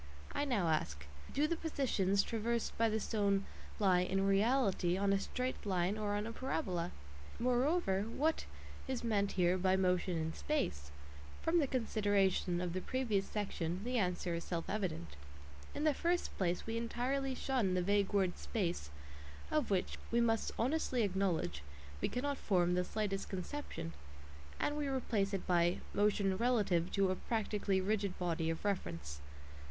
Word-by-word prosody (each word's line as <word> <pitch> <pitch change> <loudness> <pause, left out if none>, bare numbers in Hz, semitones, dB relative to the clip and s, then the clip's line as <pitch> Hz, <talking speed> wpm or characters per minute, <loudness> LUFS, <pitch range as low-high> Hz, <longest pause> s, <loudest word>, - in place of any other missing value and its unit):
I 290 - 0
now 220 -11 +1
ask: 75 - 0 0.3
Do 290 +2 +2
the 335 - +1
"positions" 215 - +1
traversed 230 0 -1
by 230 0 +3
the 220 0 0
stone 200 -2 +1 0.3
lie 190 -4 +4
"in 190 +2 +1
reality" 195 -3 +3
on 200 0 +2
a 195 - +3
straight 255 +5 -3
line 185 -1 +1
or 210 -1 -1
on 205 +1 -1
a 230 - -4
parabola? 205 - -2 0.5
Moreover, 250 - +2
what 310 +7 0 0.4
is 260 -2 -2
meant 205 -4 +1
here 180 0 +3
by 185 +1 +3
motion 180 -1 +1
"in 160 0 -2
space"? 75 - -2 0.5
From 335 +1 +3
the 290 - +2
considerations 205 -7 +1
of 175 -1 -2
the 185 - -2
previous 225 -7 0
section 190 -3 -2
the 250 +1 0
answer 180 -2 0
is 170 0 -2
self 170 -2 -3
evident. 185 - -2 0.7
In 290 - -2
the 305 -1 +4
first 345 +5 0
place 180 -2 0
we 225 0 -2
entirely 260 +3 -1
shun 245 -9 +1
the 180 - +1
vague 200 +1 +2
word 190 -3 +1
"space," 175 - -2 0.6
of 305 -5 +1
which, 190 -3 0
we 235 - +2
must 225 -2 +2
honestly 255 -1 +1
acknowledge, 190 - 0 0.4
we - - +1
cannot 280 +3 -2
form 180 -3 +2
the 180 0 +2
slightest 195 0 -2
conception, 190 - -5 0.7
and 290 - 0
we 295 -1 -1
replace 230 -7 0
it 195 -2 -2
by 175 0 +3 0.2
"motion 205 -2 +2
relative 205 -7 +2
to 195 -1 +3
a - - 0
practically 205 -3 0
rigid 200 0 0
body 165 -2 0
of 165 +4 -3
reference." 80 - -2
200 Hz, 160 wpm, -35 LUFS, 180-240 Hz, 0.7 s, lie